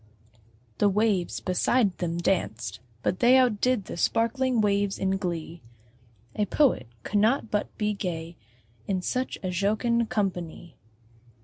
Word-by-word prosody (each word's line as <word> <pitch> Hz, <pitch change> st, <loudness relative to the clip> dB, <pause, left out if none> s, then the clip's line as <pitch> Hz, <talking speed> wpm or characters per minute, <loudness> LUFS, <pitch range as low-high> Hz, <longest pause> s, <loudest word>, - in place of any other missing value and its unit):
The 205 Hz, -, +4 dB
waves 200 Hz, -3 st, +1 dB
beside 195 Hz, +2 st, +1 dB
them 170 Hz, -1 st, -2 dB
danced; 120 Hz, -, -1 dB, 0.2 s
but 180 Hz, -, 0 dB
they 250 Hz, +2 st, +6 dB
Out 245 Hz, -5 st, +3 dB
did 250 Hz, -6 st, +1 dB
the -, -, -7 dB
sparkling 235 Hz, +5 st, +1 dB
waves 200 Hz, -1 st, +1 dB
in 190 Hz, 0 st, 0 dB
glee: 170 Hz, -3 st, -4 dB, 0.7 s
A 210 Hz, -1 st, 0 dB
Poet 250 Hz, -, +2 dB, 0.2 s
could 205 Hz, -, 0 dB
not 225 Hz, +2 st, +2 dB
but 210 Hz, 0 st, -2 dB
be 210 Hz, -1 st, 0 dB
gay 170 Hz, -4 st, -4 dB, 0.5 s
In 185 Hz, -2 st, -1 dB
such 255 Hz, +6 st, -2 dB
a 185 Hz, -, -2 dB
jocund 220 Hz, +5 st, +1 dB
company! 175 Hz, -5 st, -3 dB
200 Hz, 135 wpm, -26 LUFS, 180-225 Hz, 0.7 s, they